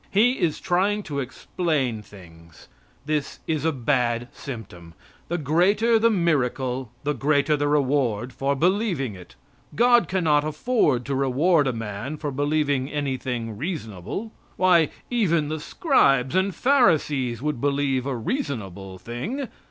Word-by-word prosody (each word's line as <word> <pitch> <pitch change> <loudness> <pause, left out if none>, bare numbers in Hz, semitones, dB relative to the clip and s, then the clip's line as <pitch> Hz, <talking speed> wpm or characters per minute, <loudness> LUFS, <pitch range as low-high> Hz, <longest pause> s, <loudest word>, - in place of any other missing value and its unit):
He 235 +6 +3
is 170 -5 0
trying 200 +4 +1
to 145 -5 -4
explain 135 -2 -2
things. 85 -5 -16 0.4
That 150 -2 -2
is 155 -2 -1
a 160 - +2
bad 120 -3 0
symptom. 90 - -9 0.3
The 175 - -1
greater 190 - +3
the 230 +1 +4
miracle 130 - 0
the 150 +1 0
greater 145 +2 +2
the 145 0 0
reward 130 -5 +1
for 140 +2 0
believing 175 - 0
it. 90 -10 -13 0.4
God 240 0 +5
cannot 160 -6 +2
afford 155 - +1
to 140 - -2
reward 140 +4 +2
a - - +2
man 115 +5 -5
for 145 -1 -4
believing 145 -1 0
anything 130 -6 -3
reasonable. 145 - -5 0.3
Why, 175 -4 +4 0.2
even 170 -11 +1
the 155 0 -3
scribes 135 - +2
and 190 0 +1
Pharisees 150 - +2
would 150 -5 -2
believe 140 -2 0
a 135 - -1
reasonable 105 - -4
thing. 190 - -5
145 Hz, 135 wpm, -24 LUFS, 125-175 Hz, 0.4 s, God